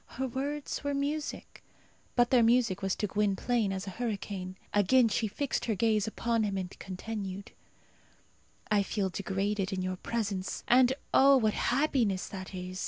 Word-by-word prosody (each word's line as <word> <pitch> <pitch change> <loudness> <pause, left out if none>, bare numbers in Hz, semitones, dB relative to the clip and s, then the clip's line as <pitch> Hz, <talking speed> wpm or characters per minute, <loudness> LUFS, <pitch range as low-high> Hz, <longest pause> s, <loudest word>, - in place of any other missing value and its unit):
Her 265 +1 -1
words 280 +5 -3
were 285 0 -1
music, 290 +2 -3 0.5
but 240 -1 +3
their 250 -2 +6
music 230 -4 +3
was 195 -1 0
to - - -1
Gwynplaine 210 +2 0
as 190 0 -4
a 195 - -5
hurricane. 195 -5 -4 0.2
Again 225 +4 +4
she 220 +1 0
fixed 270 +7 -2
her 225 - 0
gaze 215 0 +2
upon 230 +1 0
him 200 -2 -1
and 185 -1 -4
continued, 195 0 -6 1.2
"I 210 -1 +4
feel 195 0 -1
degraded 195 +1 -2
in 185 -1 -2
your 185 0 -2
presence, 200 -3 -3
and 250 0 +6 0.2
oh, 275 0 +7
what 215 -4 +2
happiness 245 -8 +1
that 190 -1 -7
is! 185 0 -6
210 Hz, 160 wpm, -30 LUFS, 195-245 Hz, 1.2 s, oh